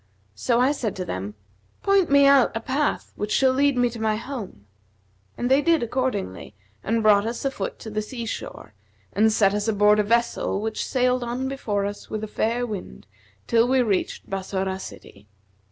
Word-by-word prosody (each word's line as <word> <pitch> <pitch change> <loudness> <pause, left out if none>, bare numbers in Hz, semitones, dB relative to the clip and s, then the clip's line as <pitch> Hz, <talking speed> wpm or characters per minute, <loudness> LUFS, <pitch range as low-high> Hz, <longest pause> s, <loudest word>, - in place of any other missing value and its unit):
So 235 - +1
I 255 +3 +4
said 235 -8 -3
to 185 - -4
them, 100 - -5 0.5
'Point 395 -3 +3
me 280 0 +6
out 275 -4 +5
a - - -2
path 270 +6 -2
which 210 +1 -4
shall 260 +4 +3
lead 280 0 +2
me 245 0 +3
to 230 -1 -8
my 220 -1 +1
home,' 215 - -7 0.7
and - - -3
they 265 +3 +4
did 330 -3 +2
accordingly, 235 - -3 0.3
and 225 +1 0
brought 210 0 +5
us 235 +3 -4
a 275 - +1
foot 200 -7 -5
to 220 - -9
the 215 0 -1
sea 235 +2 -6
shore 110 - -7 0.4
and 220 +2 +4
set 200 -2 +3
us 210 +1 -1
aboard 210 0 +4
a - - +4
vessel 235 -2 0
which 220 +1 -3
sailed 250 -1 +1
on 245 +2 -3
before 210 -7 -2
us 205 0 -6
with 215 0 -4
a - - -3
fair 235 +3 -1
wind, 190 - -7 0.4
till 230 +1 +3
we 260 0 +3
reached 200 -5 -1
Bassorah 190 0 -3
city. 105 - -11
225 Hz, 190 wpm, -24 LUFS, 205-255 Hz, 0.7 s, me